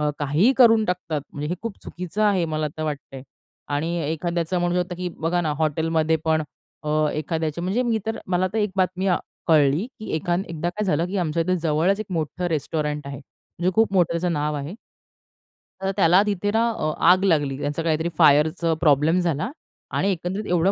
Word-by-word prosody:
अ, 150 Hz, -, +1 dB
काहीही 150 Hz, -, +3 dB
करून 225 Hz, -4 st, +6 dB
टाकतात. 175 Hz, -5 st, -2 dB
म्हणजे 145 Hz, +1 st, -4 dB
हे 175 Hz, -, -1 dB
खूप 230 Hz, -3 st, -5 dB
चुकीचं 180 Hz, +4 st, -4 dB
आहे 200 Hz, -4 st, +3 dB
मला 155 Hz, -1 st, -2 dB
तर 155 Hz, -, -4 dB
वाटतंय 145 Hz, -3 st, -5 dB, 0.5 s
आणि 165 Hz, +4 st, -1 dB
एखाद्याचं 170 Hz, +2 st, -1 dB
म्हणू 175 Hz, 0 st, 0 dB
शकतो, 180 Hz, 0 st, -7 dB
की 180 Hz, 0 st, -3 dB
बघा 170 Hz, +2 st, 0 dB
ना, 155 Hz, -3 st, -1 dB
हॉटेलमध्ये 160 Hz, +1 st, +1 dB
पण 160 Hz, -1 st, +2 dB, 0.4 s
अ, -, -, -3 dB, 0.2 s
एखाद्याच्या 160 Hz, +1 st, -2 dB
म्हणजे 195 Hz, +8 st, 0 dB
मी 230 Hz, -3 st, +1 dB
तर 225 Hz, 0 st, -2 dB
मला 180 Hz, 0 st, +1 dB
तर 220 Hz, -, -1 dB
एक 210 Hz, -2 st, +1 dB
बातमी 185 Hz, 0 st, 0 dB
अ, 180 Hz, -, +3 dB, 0.3 s
कळली, 150 Hz, +4 st, +4 dB
की 215 Hz, -, -8 dB
एक 175 Hz, +3 st, -6 dB
एकदा 175 Hz, -2 st, -1 dB
काय 205 Hz, +4 st, -3 dB
झालं, 170 Hz, -2 st, +1 dB
की 195 Hz, -, -4 dB
आमच्या 165 Hz, -1 st, 0 dB
इथे 185 Hz, +2 st, 0 dB
जवळच 165 Hz, +6 st, +2 dB
एक 215 Hz, -, -5 dB
मोठं 165 Hz, +1 st, -2 dB
रेस्टॉरंट 150 Hz, -2 st, -2 dB
आहे. 140 Hz, 0 st, -6 dB, 0.4 s
जे 185 Hz, -, +3 dB
खूप 225 Hz, -3 st, +3 dB
मोठं 175 Hz, -3 st, +3 dB
त्याचं 170 Hz, +1 st, 0 dB
नाव 150 Hz, -1 st, -1 dB
आहे. 145 Hz, +5 st, -5 dB, 1.1 s
तर 195 Hz, -, 0 dB
त्याला 180 Hz, 0 st, +5 dB
तिथे 205 Hz, -1 st, -1 dB
ना 225 Hz, +2 st, +2 dB
अ, 155 Hz, -8 st, -2 dB, 0.2 s
आग 185 Hz, +2 st, +5 dB
लागली. 145 Hz, -7 st, +2 dB
त्याचं 145 Hz, +3 st, -2 dB
काहीतरी 160 Hz, +1 st, 0 dB
फायरच 150 Hz, +4 st, +4 dB, 0.2 s
प्रॉब्लेम 155 Hz, +3 st, +4 dB
झाला 170 Hz, 0 st, -1 dB, 0.5 s
आणि 200 Hz, -, +2 dB
एकंदरीत 190 Hz, +4 st, -3 dB
एवढं 180 Hz, +2 st, +3 dB
170 Hz, 190 wpm, -23 LUFS, 155-185 Hz, 1.1 s, करून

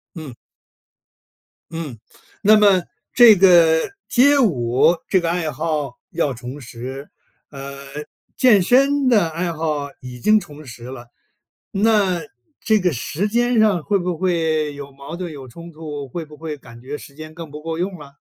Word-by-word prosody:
嗯。 155 Hz, -7 st, -8 dB, 1.4 s
嗯， 155 Hz, -8 st, -6 dB, 0.4 s
那 215 Hz, +1 st, +6 dB
么 200 Hz, -4 st, +5 dB, 0.3 s
这 235 Hz, -4 st, +8 dB
个 170 Hz, -3 st, +5 dB, 0.2 s
街 280 Hz, +3 st, +4 dB
舞 135 Hz, -, +3 dB
这 190 Hz, -, +3 dB
个 170 Hz, -1 st, -1 dB
爱 170 Hz, -2 st, -1 dB
好 150 Hz, -5 st, -3 dB
要 140 Hz, -, -1 dB
重 125 Hz, +3 st, -8 dB
拾， 130 Hz, +3 st, -8 dB, 0.4 s
呃， 140 Hz, -1 st, -8 dB, 0.6 s
健 215 Hz, -7 st, +5 dB
身 275 Hz, +5 st, +3 dB
的 210 Hz, -9 st, +4 dB
爱 170 Hz, +2 st, -3 dB
好 155 Hz, -3 st, -2 dB
已 125 Hz, -1 st, -9 dB
经 215 Hz, -, +4 dB
重 150 Hz, -4 st, -12 dB
拾 120 Hz, -3 st, -11 dB
了， 120 Hz, -2 st, -9 dB, 0.6 s
那 200 Hz, -4 st, +2 dB, 0.4 s
这 220 Hz, -1 st, +2 dB
个 180 Hz, -3 st, +1 dB
时 155 Hz, -, -2 dB
间 240 Hz, +1 st, +1 dB
上 205 Hz, -7 st, +3 dB
会 200 Hz, +2 st, +1 dB
不 180 Hz, -1 st, -3 dB
会 160 Hz, -4 st, 0 dB
有 140 Hz, -1 st, -9 dB
矛 140 Hz, +5 st, -9 dB
盾、 180 Hz, -2 st, -5 dB
有 135 Hz, -3 st, -9 dB
冲 170 Hz, +6 st, -11 dB
突， 150 Hz, -3 st, -7 dB
会 165 Hz, +6 st, -5 dB
不 150 Hz, -1 st, -14 dB
会 155 Hz, -1 st, -5 dB
感 120 Hz, -4 st, -14 dB
觉 140 Hz, +4 st, -6 dB
时 140 Hz, -, -13 dB
间 155 Hz, +1 st, -10 dB
更 165 Hz, -2 st, -9 dB
不 150 Hz, +1 st, -9 dB
够 165 Hz, 0 st, -4 dB
用 180 Hz, 0 st, -3 dB
了？ 140 Hz, -1 st, -13 dB
160 Hz, 175 characters per minute, -20 LUFS, 140-190 Hz, 1.4 s, 这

